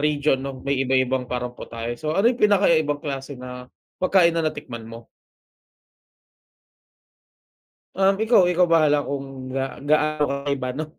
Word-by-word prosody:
region 145 Hz, -2 st, +1 dB
'no, 135 Hz, -1 st, -7 dB
may 140 Hz, -1 st, 0 dB
iba-ibang 130 Hz, 0 st, +1 dB
paraan 125 Hz, 0 st, -3 dB
po -, -, -8 dB
tayo. 115 Hz, 0 st, -5 dB
So, 155 Hz, 0 st, -2 dB
ano 200 Hz, -, +3 dB
yung 250 Hz, -, -4 dB
pinaka-kakaibang 165 Hz, -8 st, +3 dB
klase 140 Hz, -1 st, -5 dB
na 125 Hz, 0 st, -9 dB, 0.3 s
pagkain 185 Hz, -2 st, +4 dB
na 165 Hz, -, 0 dB
natikman 120 Hz, -7 st, -6 dB
mo? 115 Hz, 0 st, -11 dB, 2.9 s
Um, 195 Hz, +1 st, +3 dB
ikaw, 225 Hz, -3 st, +5 dB
ikaw 180 Hz, 0 st, +3 dB
bahala 155 Hz, -3 st, +3 dB
kung 135 Hz, -2 st, -6 dB
ga 135 Hz, -1 st, -3 dB
gaano 150 Hz, +1 st, +1 dB
kakaiba 140 Hz, -2 st, -2 dB
'no. 155 Hz, +3 st, -3 dB
140 Hz, 140 wpm, -23 LUFS, 130-160 Hz, 2.9 s, ikaw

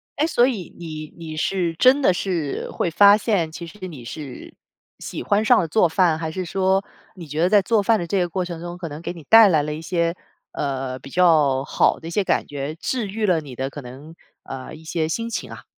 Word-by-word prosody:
哎， 295 Hz, -, +1 dB
所 245 Hz, -6 st, +3 dB
以 205 Hz, -10 st, -4 dB
你 155 Hz, -2 st, -7 dB
你 160 Hz, -2 st, -7 dB
是 170 Hz, +1 st, -1 dB
真 260 Hz, +6 st, +5 dB
的 220 Hz, -, +4 dB
是 175 Hz, -6 st, -3 dB
会 -, -, -1 dB
发 200 Hz, +5 st, +6 dB
现， 200 Hz, -7 st, 0 dB
其 170 Hz, +1 st, -8 dB
实 185 Hz, +1 st, -9 dB
你 140 Hz, -9 st, -10 dB
是 135 Hz, 0 st, -8 dB, 0.5 s
喜 -, -, -6 dB
欢 205 Hz, +1 st, +2 dB
上 240 Hz, +1 st, +5 dB
了 170 Hz, -, 0 dB
做 175 Hz, +2 st, +3 dB
饭， 170 Hz, -2 st, +2 dB
还 160 Hz, -1 st, -4 dB
是 185 Hz, +2 st, -4 dB
说 190 Hz, +2 st, +1 dB, 0.3 s
你 175 Hz, -4 st, -10 dB
觉 150 Hz, +2 st, -3 dB
得 180 Hz, -, +3 dB
在 205 Hz, -1 st, +5 dB
做 215 Hz, +1 st, +1 dB
饭 225 Hz, +1 st, +3 dB
的 170 Hz, -, -4 dB
这 195 Hz, +3 st, 0 dB
个 175 Hz, -1 st, 0 dB
过 180 Hz, +1 st, -2 dB
程 170 Hz, -2 st, -7 dB
中 175 Hz, 0 st, -6 dB
可 175 Hz, -2 st, -6 dB
能 150 Hz, +1 st, -8 dB
给 170 Hz, -, -4 dB
你 165 Hz, -3 st, -10 dB
带 225 Hz, -2 st, +9 dB
来 155 Hz, -4 st, +3 dB
了 150 Hz, 0 st, -3 dB
一 155 Hz, -, -6 dB
些， 170 Hz, 0 st, -1 dB, 0.4 s
呃， 135 Hz, -2 st, -3 dB
比 140 Hz, -, -12 dB
较 150 Hz, -6 st, +3 dB
好 -, -, +2 dB
的 160 Hz, -, -9 dB
一 170 Hz, -, -6 dB
些 205 Hz, +3 st, +1 dB
感 -, -, 0 dB
觉， 145 Hz, +1 st, -5 dB
治 225 Hz, +6 st, -3 dB
愈 215 Hz, +2 st, -2 dB
了 180 Hz, -5 st, +2 dB
你 140 Hz, -4 st, -10 dB
的 130 Hz, +2 st, -3 dB
可 145 Hz, -, -8 dB
能， 135 Hz, +6 st, -11 dB, 0.3 s
呃， 130 Hz, +2 st, -8 dB
一 160 Hz, +1 st, -12 dB
些 160 Hz, -1 st, -2 dB
心 230 Hz, +7 st, -2 dB
情 -, -, -5 dB
啊。 -, -, -10 dB
170 Hz, 260 characters per minute, -22 LUFS, 155-195 Hz, 0.5 s, 带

